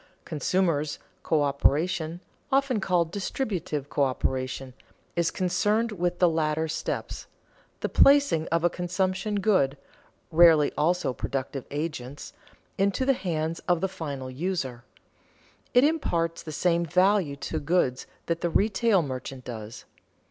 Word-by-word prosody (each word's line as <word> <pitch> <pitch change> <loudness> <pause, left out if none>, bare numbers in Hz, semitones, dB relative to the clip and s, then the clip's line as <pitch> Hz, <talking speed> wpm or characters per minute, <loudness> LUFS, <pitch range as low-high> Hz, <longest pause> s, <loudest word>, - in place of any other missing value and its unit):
Consumers' 155 -2 0 0.3
coöperation 155 +3 +1 0.3
(often 270 -4 +2
called 175 -4 +1
distributive 185 - -3
coöperation) 130 -1 -1 0.4
is 170 -1 +2
concerned 205 +6 +1
with 180 -3 -1
the 180 - +5
later 160 -1 0
steps, 155 - -4 0.5
the - - 0
placing 280 - +4
of 165 0 0
a 175 - +4
consumption 185 +3 -1
good 145 -10 +2 0.5
(rarely 160 -3 +6
also 165 -2 +1
productive 135 +1 -4
agents) 145 -3 -5 0.5
into 200 +6 +1
the 270 - +4
hands 165 -6 -2
of 175 -2 +3
the 190 - 0
final 140 -8 -6
user. 135 -5 -3 0.9
It 245 0 +5
imparts 170 - 0
the 155 - -8
same 170 +2 +1
value 180 -2 +2
to 155 +3 -4
goods 145 -5 0 0.2
that 170 0 -2
the 170 - 0
retail 205 0 +2
merchant 130 -1 -6
does. 110 -2 -8
165 Hz, 120 wpm, -27 LUFS, 145-185 Hz, 0.9 s, rarely